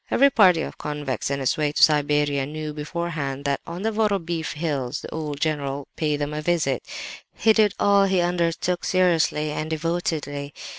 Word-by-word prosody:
Every 280 Hz, +2 st, +5 dB
party 185 Hz, -8 st, +5 dB
of -, -, -8 dB
convicts 145 Hz, -5 st, -3 dB
on 140 Hz, 0 st, -2 dB
its 130 Hz, +3 st, 0 dB
way 150 Hz, -1 st, +1 dB
to -, -, +3 dB
Siberia 145 Hz, -2 st, +3 dB
knew 155 Hz, 0 st, -5 dB
beforehand 150 Hz, -3 st, -4 dB
that 140 Hz, 0 st, 0 dB
on 175 Hz, +3 st, -6 dB
the 225 Hz, -, +1 dB
Vorobeef 195 Hz, -7 st, -1 dB
Hills 145 Hz, -4 st, -2 dB
the -, -, -8 dB
"old 150 Hz, -3 st, -4 dB
general" 145 Hz, -3 st, -1 dB
would -, -, -19 dB
pay 150 Hz, -2 st, 0 dB
them 145 Hz, +1 st, -3 dB
a 150 Hz, -, -3 dB
visit. 150 Hz, -6 st, 0 dB, 0.5 s
He 220 Hz, 0 st, +4 dB
did 210 Hz, -2 st, +3 dB
all 200 Hz, -1 st, +4 dB
he 190 Hz, -1 st, +2 dB
undertook 175 Hz, 0 st, 0 dB
seriously 165 Hz, -4 st, +2 dB
and 155 Hz, +1 st, -3 dB
devotedly. 155 Hz, -3 st, -2 dB
155 Hz, 180 wpm, -24 LUFS, 145-175 Hz, 0.5 s, Every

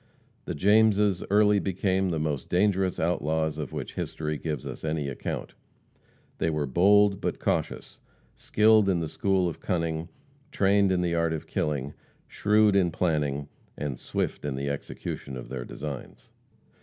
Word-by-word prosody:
The -, -, -4 dB
Jameses 105 Hz, +1 st, +3 dB
early 105 Hz, 0 st, +4 dB
became 95 Hz, 0 st, 0 dB
the 85 Hz, -, -1 dB
most 75 Hz, -3 st, -2 dB
dangerous 95 Hz, 0 st, +1 dB
outlaws 80 Hz, -2 st, 0 dB
of 75 Hz, -5 st, -4 dB
which -, -, -5 dB
history 75 Hz, -1 st, -3 dB
gives 75 Hz, -3 st, -4 dB
us -, -, -7 dB
any 75 Hz, -2 st, -1 dB
account. 65 Hz, -, -5 dB, 0.9 s
They -, -, +1 dB
were 75 Hz, -2 st, -1 dB
bold, 100 Hz, +7 st, +4 dB
but -, -, -2 dB
cautious; -, -, -2 dB, 0.3 s
skilled 110 Hz, -1 st, +4 dB
in 90 Hz, -3 st, +2 dB
the 80 Hz, -, -2 dB
school 95 Hz, +2 st, +1 dB
of 85 Hz, -, -5 dB
cunning; 85 Hz, -3 st, -2 dB, 0.4 s
trained 100 Hz, 0 st, +3 dB
in 90 Hz, -1 st, +1 dB
the 85 Hz, -1 st, 0 dB
art 85 Hz, -1 st, +1 dB
of 80 Hz, -, -5 dB
killing; 70 Hz, -2 st, -2 dB, 0.3 s
shrewd 105 Hz, 0 st, +3 dB
in 95 Hz, -3 st, +4 dB
planning, 75 Hz, -4 st, -1 dB, 0.3 s
and 70 Hz, -4 st, -4 dB
swift -, -, -3 dB
in 75 Hz, -2 st, -2 dB
the 70 Hz, +1 st, -2 dB
execution 70 Hz, -1 st, -6 dB
of 60 Hz, -, -9 dB
their 60 Hz, -2 st, -5 dB
designs. 70 Hz, +1 st, -8 dB
85 Hz, 155 wpm, -27 LUFS, 75-100 Hz, 0.9 s, early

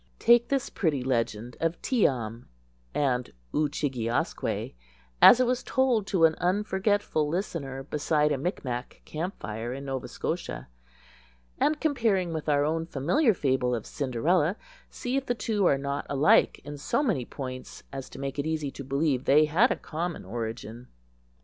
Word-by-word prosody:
Take 235 Hz, 0 st, +5 dB
this 275 Hz, -1 st, -1 dB
pretty 150 Hz, -8 st, 0 dB
legend 120 Hz, -2 st, -1 dB
of 165 Hz, +1 st, -1 dB
Tee 245 Hz, -6 st, +3 dB
am 115 Hz, -2 st, -5 dB, 0.5 s
and 125 Hz, -4 st, 0 dB, 0.2 s
Oo 150 Hz, 0 st, +2 dB
chig 145 Hz, -2 st, -2 dB
e 115 Hz, -1 st, -2 dB
asque 120 Hz, -, -2 dB, 0.5 s
as 245 Hz, -, +10 dB
it 255 Hz, -, +4 dB
was 250 Hz, 0 st, 0 dB
told 250 Hz, -7 st, +1 dB
to 175 Hz, -5 st, +4 dB
an 160 Hz, -, +4 dB
unforgetful 190 Hz, -3 st, +1 dB
listener 150 Hz, -7 st, -3 dB
beside 150 Hz, +1 st, +1 dB
a 145 Hz, -, +1 dB
Mic 175 Hz, +1 st, -3 dB
Mac 125 Hz, 0 st, -5 dB
camp 170 Hz, +5 st, -4 dB
fire 110 Hz, +4 st, -4 dB
in 135 Hz, +1 st, -7 dB
Nova 135 Hz, -2 st, -3 dB
Scotia, -, -, -4 dB, 0.9 s
and, 300 Hz, 0 st, +2 dB
comparing 220 Hz, -, +1 dB
with 155 Hz, -1 st, -3 dB
our 145 Hz, 0 st, +3 dB
own 165 Hz, +1 st, -1 dB
familiar 195 Hz, -, +2 dB
fable 130 Hz, -4 st, +1 dB
of 115 Hz, -, -5 dB
Cinderella, 150 Hz, -, +1 dB, 0.3 s
see 255 Hz, +2 st, -3 dB
if 275 Hz, -, -3 dB
the 245 Hz, -, +1 dB
two 210 Hz, -4 st, +1 dB
are 140 Hz, -, +4 dB
not 140 Hz, +1 st, -3 dB
alike 140 Hz, +2 st, +4 dB
in 145 Hz, 0 st, -8 dB
so 240 Hz, -, 0 dB
many 200 Hz, -, +1 dB
points 130 Hz, 0 st, -7 dB
as 135 Hz, -1 st, -6 dB
to -, -, -11 dB
make 135 Hz, +1 st, -4 dB
it 140 Hz, -, -1 dB
easy 155 Hz, -3 st, -2 dB
to 140 Hz, -, -8 dB
believe 140 Hz, -1 st, 0 dB
they 150 Hz, +3 st, +6 dB
had 180 Hz, -, +4 dB
a -, -, +1 dB
common 170 Hz, -, -5 dB
origin. 115 Hz, +2 st, -6 dB
150 Hz, 170 wpm, -27 LUFS, 130-190 Hz, 0.9 s, as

